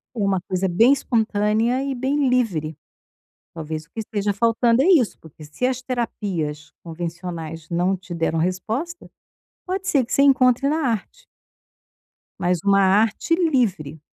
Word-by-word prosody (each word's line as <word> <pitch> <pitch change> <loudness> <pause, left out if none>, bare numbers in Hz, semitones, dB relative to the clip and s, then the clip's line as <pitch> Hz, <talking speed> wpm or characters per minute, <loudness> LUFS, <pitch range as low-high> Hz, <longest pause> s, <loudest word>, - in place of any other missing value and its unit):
Uma 200 -4 0
coisa 185 +1 -2
bem 230 +10 +5
espontânea 225 0 0
e 275 -1 -3
bem 270 +2 0
livre. 175 - 0 0.8
Talvez 155 -1 -6
o - - -40
que - - -13
esteja 205 -2 -2
faltando 230 +3 +2
é - - +2
isso, 320 - +3
porque 155 -1 -14
se 150 +12 -2
as 255 0 -2
terapias 190 - -4
convencionais 165 -1 -6
não 180 +2 0
te 185 -1 -9
deram 165 -1 -1
resposta, 220 - -3 0.6
pode 380 +1 -3
ser 275 -4 +3
que 230 - -9
você 275 - +3
encontre 260 -1 +4
na 305 -2 0
arte. 230 - -5 1.1
Mas 180 0 +1
uma 200 -1 +4
arte 210 - +2
livre. 225 - 0
210 Hz, 145 wpm, -22 LUFS, 175-255 Hz, 1.1 s, bem